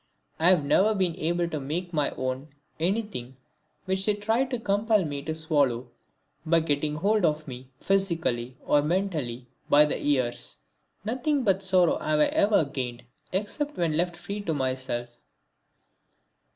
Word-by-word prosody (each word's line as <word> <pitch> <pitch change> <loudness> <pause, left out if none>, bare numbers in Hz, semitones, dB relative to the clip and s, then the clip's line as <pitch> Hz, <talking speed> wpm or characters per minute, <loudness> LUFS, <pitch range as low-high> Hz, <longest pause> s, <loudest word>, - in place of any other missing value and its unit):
I 165 +3 +5
have 175 -6 +4
never 210 +9 +3
been 185 -4 0
able 175 +1 0
to 155 -3 -3
make 170 +6 -4
my 150 -2 +1
own 130 +2 -3 0.3
anything 175 - -2 0.5
which 190 0 0
they 210 - +3
tried 225 +6 0
to 250 - -1
compel 210 -2 +1
me 145 -2 -4
to 160 +2 -4
swallow 140 -6 0 0.5
by 165 0 +3
getting 150 -1 -1
hold 205 +6 +1
of 155 -1 +1
me, 130 0 -9
physically 165 -11 0
or 145 - +4
mentally, 150 -8 -2 0.2
by 150 +1 +7
the 150 - -3
ears. 130 -5 -1 0.5
Nothing 260 +5 0
but 195 -3 +2
sorrow 185 -3 +4
have 155 0 0
I 150 - +6
ever 200 -6 +3
gained 125 -4 -5 0.3
except 250 +10 -2
when 165 -3 +1
left 175 +1 0
freely 200 +4 -5
to 160 - 0
myself. 130 -3 -3
165 Hz, 150 wpm, -27 LUFS, 140-195 Hz, 0.5 s, by